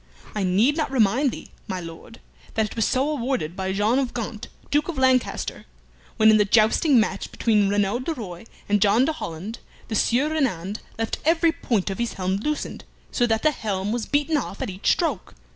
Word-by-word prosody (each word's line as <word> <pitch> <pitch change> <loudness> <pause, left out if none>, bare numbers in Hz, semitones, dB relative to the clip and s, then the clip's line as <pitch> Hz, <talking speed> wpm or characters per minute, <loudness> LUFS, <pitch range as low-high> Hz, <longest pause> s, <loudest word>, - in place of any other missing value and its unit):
I 210 - -1
need 210 - +3
not 310 - 0
remind 260 +2 +3
thee, - - -9 0.2
my 190 -3 -3
Lord, 170 +6 -10 0.4
that 220 - +2
it 210 - -8
was 225 -2 +1
so 260 +2 +1
awarded 255 - -2
by 190 0 -2
John 210 +6 +2
of 260 -3 -2
Gaunt, 225 -2 -5 0.2
Duke 295 +1 +2
of 340 -5 -4
Lancaster, 260 -1 +1 0.5
when 220 0 +6
in 215 - +6
the 210 - +5
jousting 220 - +4
match 220 - -1
between 210 -3 +2
Reynand 205 +5 0
de 330 - -2
Roye 195 - -8 0.2
and 205 -1 +2
John 215 +5 +4
de 320 - 0
Holland, 205 - -6 0.3
the 220 - -2
Sieur 255 +7 +2
Reynand 215 - -1 0.2
left 225 0 -2
every 330 +1 +3
point 215 - -1
of 195 - -6
his 235 -1 -1
helm 190 0 -1
loosened, 300 +8 -3 0.3
so 245 - +2
that 225 -1 0
the 310 - +4
helm 205 -6 -3
was 235 -1 -2
beaten 295 +2 +1
off 225 -7 -4
at - - -3
each 190 +1 -1
stroke. 295 - -1
225 Hz, 200 wpm, -24 LUFS, 200-270 Hz, 0.5 s, when